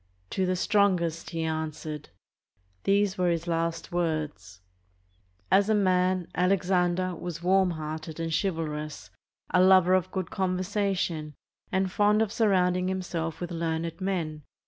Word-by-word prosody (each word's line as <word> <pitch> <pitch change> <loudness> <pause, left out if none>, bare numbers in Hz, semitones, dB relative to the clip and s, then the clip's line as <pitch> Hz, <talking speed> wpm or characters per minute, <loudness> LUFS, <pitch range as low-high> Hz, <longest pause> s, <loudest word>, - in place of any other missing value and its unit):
"To 190 -1 0
the 185 - +1
strongest," 180 -4 +1
he 165 -1 -3
an 160 0 -1
swered. 150 -1 -7 0.8
These 200 -1 +2
were 180 -1 +3
his 170 -1 -1
last 165 -1 -2
words. 155 - -2 0.9
As 200 +2 +4
a 215 - +4
man, 185 -2 +2
Alexander 180 -1 +1
was 170 0 -6
warm 190 +1 +4
hearted 155 0 -5
and 165 -1 -2
chivalrous, 155 -5 -3 0.4
a 180 - +4
lover 185 -1 +6
of 185 -2 +2
good 190 -2 -4
conversation, 185 -4 -1 0.4
and 190 0 +1
fond 210 +2 +3
of 210 - -3
surrounding 185 -4 +2
himself 175 -4 -3
with 175 0 -5
learned 165 +1 -3
men. 165 -5 -2
180 Hz, 135 wpm, -27 LUFS, 160-190 Hz, 0.9 s, lover